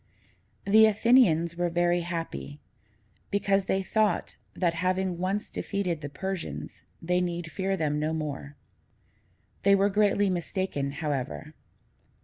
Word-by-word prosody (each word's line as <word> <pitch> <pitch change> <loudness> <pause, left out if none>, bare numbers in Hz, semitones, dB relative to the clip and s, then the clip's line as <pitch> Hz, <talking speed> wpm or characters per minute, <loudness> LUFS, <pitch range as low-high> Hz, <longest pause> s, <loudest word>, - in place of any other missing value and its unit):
The 220 +2 +7
Athenians 205 -7 +4
were 175 0 +1
very 175 +1 +2
happy, 165 -4 -5 0.7
because 200 -1 +1
they 190 0 0
thought, 215 -2 0 0.2
that, 175 -3 +1
having 185 0 -1
once 195 +3 -1
defeated 180 -6 -3
the 145 - -5
Persians, 190 +3 -5 0.2
they 180 +2 +1
need 170 -2 -3
fear 195 +4 -1
them 150 -3 0
no 155 +1 0
more. 145 -2 -4 1.1
They 200 0 +5
were 200 +1 +3
greatly 205 0 +3
mistaken, 180 -5 -2
however. 145 0 -4
180 Hz, 125 wpm, -28 LUFS, 160-195 Hz, 1.1 s, The